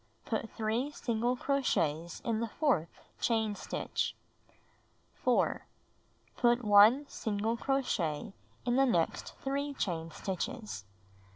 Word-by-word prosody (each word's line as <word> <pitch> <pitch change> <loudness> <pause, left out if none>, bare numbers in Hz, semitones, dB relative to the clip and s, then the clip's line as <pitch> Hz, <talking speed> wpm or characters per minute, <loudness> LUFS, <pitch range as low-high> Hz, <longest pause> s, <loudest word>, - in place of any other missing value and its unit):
Put 225 -1 -2
3 225 +5 0
single 240 -3 -1
crochets 170 - 0
in 225 -2 -1
the 230 - -1
fourth 220 - +1 0.3
chain 220 -3 +1
stitch. 200 - -3 1.0
4. - - +1 0.7
Put 240 0 +3
1 210 +7 +7
single 220 0 -1
crochet 225 - -1 0.3
in 245 0 +2
the 270 0 +5
next 170 -9 0
3 280 +1 -1
chain 165 -7 -2
stitches. 195 - -4
225 Hz, 105 wpm, -32 LUFS, 195-255 Hz, 1.0 s, 1